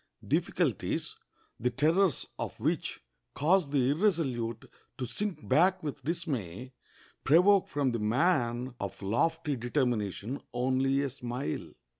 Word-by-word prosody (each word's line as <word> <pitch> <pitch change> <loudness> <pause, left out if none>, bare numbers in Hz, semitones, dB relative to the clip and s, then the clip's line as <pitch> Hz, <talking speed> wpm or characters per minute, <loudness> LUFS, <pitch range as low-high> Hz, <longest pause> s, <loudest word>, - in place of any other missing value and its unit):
Difficulties, - - 0 0.4
the 125 - +1
terrors 155 +6 +2
of - - -5
which - - -1 0.3
cause 165 +1 +3
the 135 -2 +2
irresolute 140 - 0 0.3
to 130 - -2
sink 170 - -3
back 185 - +3
with 145 -2 -5
dismay, 130 - -3 0.5
provoke 180 +7 +5
from 140 -3 0
the 115 - -2
man 120 +1 +1
of 100 -1 -5
lofty 150 - +1
determination 120 -2 -1
only 130 +2 +2
a 140 - -1
smile. 125 - -4
135 Hz, 115 wpm, -30 LUFS, 120-160 Hz, 0.5 s, provoke